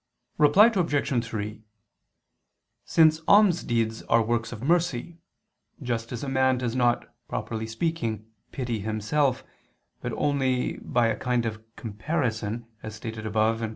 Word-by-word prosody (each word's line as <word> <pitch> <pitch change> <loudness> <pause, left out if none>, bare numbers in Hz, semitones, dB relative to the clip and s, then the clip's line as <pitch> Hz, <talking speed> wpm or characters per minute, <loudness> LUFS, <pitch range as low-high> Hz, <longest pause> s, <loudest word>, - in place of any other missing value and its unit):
Reply 190 +10 +7
Obj. 145 - +1
3: 110 -2 -5 1.2
Since 160 -1 +4
almsdeeds 120 - +3
are 115 0 +5
works 115 +1 -1
of 120 -1 -8
mercy, 170 0 0 0.6
just 115 -3 -3
as 120 0 -5
a - - -3
man 130 -1 +2
does 125 -1 -2
not, 120 -1 +1
properly 110 -1 -4
speaking, 115 - -2 0.3
pity 120 -5 -3
himself, 110 +6 0 0.6
but - - -3
only 130 -3 0
by 120 -1 0
a 115 -1 +1
kind 125 -2 0
of 110 -1 -4
comparison, 115 -1 -3 0.2
as 110 0 -7
stated 110 -1 -6
above 110 +1 +1
(Q. 115 -1 -2
120 Hz, 130 wpm, -26 LUFS, 110-145 Hz, 1.2 s, Reply